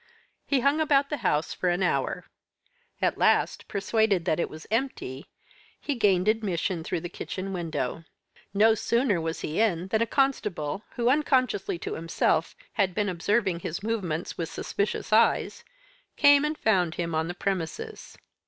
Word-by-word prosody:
He 275 -3 +2
hung 280 +4 +2
about 285 -2 +2
the 295 - 0
house 150 - 0
for 180 - -1
an 175 +2 +1
hour. 175 - 0 0.8
At - - +1
last, - - +2
persuaded 200 -2 +1
that 155 - +1
it - - 0
was 155 0 -10
empty, 220 - -2 0.5
he 290 - -2
gained 200 -6 +2
admission 195 -5 0
through 165 - -2
the 175 - -4
kitchen 190 +2 -5
window. 165 -4 -3 0.5
No 215 +3 +5
sooner 230 -4 +1
was 160 0 -3
he 155 +5 -3
in 185 -4 +1
than 220 +2 +1
a 230 - +2
constable 210 - 0
who, 240 -1 0
unconsciously 255 - +2
to - - -5
himself, 165 0 0 0.2
had 190 -4 +1
been 210 -2 0
observing 190 +1 0
his 170 +3 -5
movements 185 -9 -3
with 165 - -2
suspicious 205 +1 -2
eyes, 230 +1 +3 0.5
came 285 0 +6
and 305 +1 -2
found 180 - +2
him 170 -1 -3
on 160 +1 0
the 175 - -5
premises. 180 -4 -4
195 Hz, 160 wpm, -27 LUFS, 170-230 Hz, 0.8 s, came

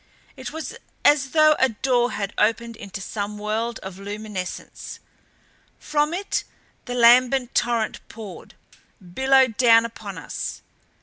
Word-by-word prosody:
It - - -7
was 320 0 -6 0.3
as 285 -2 +5
though 310 +1 +5
a 265 - +4
door 245 +2 +1
had 200 0 -3
opened 230 +2 +1
into 195 -2 -8
some 205 +1 -4
world 220 +2 -2
of 190 0 -8
luminescence. 205 -2 -6 0.8
From 300 0 0
it 385 +4 -2 0.4
the 245 - -4
lambent 245 +1 +5
torrent 235 -2 0
poured; 215 -4 -10 0.4
billowed 260 +6 +2
down 230 -2 +6
upon 210 -5 -8
us. 165 - -6
230 Hz, 125 wpm, -23 LUFS, 210-260 Hz, 0.8 s, down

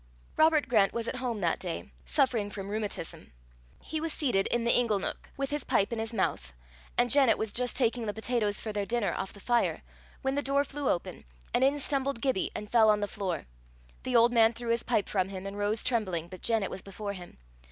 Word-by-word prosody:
Robert 310 -3 +4
Grant 210 -5 +3
was 235 0 -2
at - - -3
home 245 -3 -2
that 170 -2 +1
day, 165 - -5 0.2
suffering 225 - +1
from 195 -1 -6
rheumatism. 210 -5 -5 0.5
He 315 0 -3
was 325 0 -1
seated 245 -12 +1
in 240 -1 0
the 235 - +4
ingle 235 -4 +3
neuk, 195 - -4
with 275 0 -2
his 295 0 -1
pipe 200 +4 +1
in 230 - -2
his 225 0 -3
mouth, 65 - -1 0.4
and 245 -1 +3
Janet 270 -5 +6
was 220 -1 -3
just 250 0 -1
taking 235 -2 +1
the 210 - -1
potatoes 220 -2 0
for 215 - -5
their 205 -1 -2
dinner 235 -3 0
off 190 - -4
the 200 - -14
fire, 240 +3 +1 0.4
when 265 0 +1
the 285 - 0
door 280 0 +2
flew 285 0 -3
open, 175 - -2 0.3
and 255 - +3
in 275 +2 +4
stumbled 275 -2 -1
Gibbie, 260 -6 0
and 210 0 -6
fell 225 -2 +6
on 210 -1 +4
the 205 - -1
floor. 190 -6 -3 0.6
The 255 - -2
old 235 +1 +6
man 225 -1 +5
threw 235 0 -5
his 235 - +1
pipe 230 -4 0
from 190 -2 0
him, 190 -1 -6
and 195 0 -5
rose 205 +2 -1
trembling, 185 -9 -1
but 185 -1 -10
Janet 225 -4 +1
was 190 - -6
before 200 +1 -6
him. 180 - -11
225 Hz, 225 wpm, -29 LUFS, 200-250 Hz, 0.6 s, Janet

